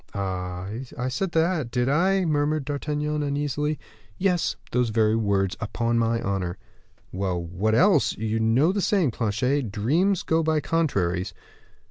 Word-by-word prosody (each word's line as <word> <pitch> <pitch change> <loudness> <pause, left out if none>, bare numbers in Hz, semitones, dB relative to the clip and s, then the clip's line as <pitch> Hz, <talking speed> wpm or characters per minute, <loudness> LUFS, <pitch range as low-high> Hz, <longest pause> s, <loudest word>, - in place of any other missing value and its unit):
'" - - -30
"Ah! 90 -2 -3 0.3
I 125 +1 -1
said 170 +8 -2
that, 160 -5 +1
did 125 +1 0
I?" 185 +6 +2
murmured 150 -1 0
D'Artagnan, 150 +1 -2
uneasily. 145 +1 -1 0.4
"Yes, 180 -3 +1 0.2
those 125 -2 +1
very 110 0 +2
words, 100 -4 +1
upon 115 +1 0
my 115 0 +1
honor." 95 -3 -2 0.5
"Well, 95 -1 -2
what 95 +6 0
else? 180 - +4
You 110 +1 -1
know 115 +9 +3
the 200 +1 -1
saying, 185 - +2
Planchet, 115 +3 0
'dreams 160 - +1
go 160 0 +2
by 160 -1 +1
contraries. 100 - 0
125 Hz, 145 wpm, -25 LUFS, 105-155 Hz, 0.5 s, else